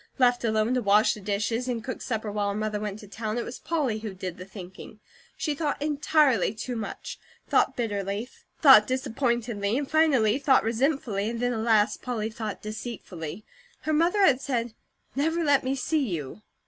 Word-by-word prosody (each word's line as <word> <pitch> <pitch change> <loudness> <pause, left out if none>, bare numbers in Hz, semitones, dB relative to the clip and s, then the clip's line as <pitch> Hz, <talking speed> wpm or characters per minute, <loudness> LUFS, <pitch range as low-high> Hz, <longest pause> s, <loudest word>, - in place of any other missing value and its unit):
Left 245 -2 +3
alone 220 +1 +1
to 250 - +1
wash 210 +1 +4
the 215 - -8
dishes 210 +5 -1
and 235 -3 -2
cook 255 - -5
supper 220 -3 -3
while 205 -1 -1
her 200 - -2
mother 215 -1 -2
went 210 -1 -4
to 210 - -12
town, 215 +2 -4
it 240 - -2
was 240 - -7
Polly, 290 -10 -1
who 215 -3 -6
did 185 -2 -6
the 185 - -7
thinking. 190 +2 -11 0.4
She 305 - -1
thought 290 0 -2
entirely 290 - +2
too 245 +3 -4
much, 215 -3 -6 0.3
thought - - +2
bitterly, 205 -1 -2 0.4
thought 260 -8 +9
disappointedly, 240 -4 -1
and 285 -1 -2
finally 275 -7 +3
thought 275 -1 +4
resentfully, 225 -3 0
and 230 0 -4
then 245 0 0
alas, 220 -1 +2
Polly 225 -3 -3
thought 215 -2 -5
deceitfully. 215 -5 -6 0.4
Her 310 - -1
mother 340 +6 +3
had 265 -5 +4
said: 240 -5 -2 0.4
"Never 320 +4 +1
let 285 -3 +3
me 260 +1 0
see 290 +3 0
you." 160 +2 -5
230 Hz, 180 wpm, -27 LUFS, 210-265 Hz, 0.4 s, thought